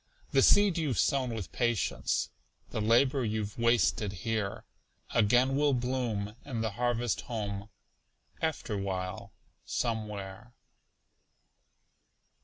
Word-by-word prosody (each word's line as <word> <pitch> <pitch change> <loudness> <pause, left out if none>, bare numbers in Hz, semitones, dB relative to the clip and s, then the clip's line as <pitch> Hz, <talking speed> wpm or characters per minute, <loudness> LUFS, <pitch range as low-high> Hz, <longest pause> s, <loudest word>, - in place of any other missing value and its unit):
The - - +4
seed 205 -4 +5
you've 145 -6 0
sown 135 -3 +2
with 110 -5 -5
patience, 120 -6 0 0.4
The 110 - -2
labor 130 +5 +3
you've 110 -1 -2
wasted 115 -3 +2
here, 110 -3 -2 0.5
Again 120 +5 +4
will 145 -1 +3
bloom 120 -5 -2
in 120 -6 -3
the 110 -1 -1
harvest 120 +1 0
home, 105 -2 -3 0.7
Afterwhile, 100 - -3 0.3
somewhere. 110 0 -4
115 Hz, 95 wpm, -30 LUFS, 105-125 Hz, 0.7 s, seed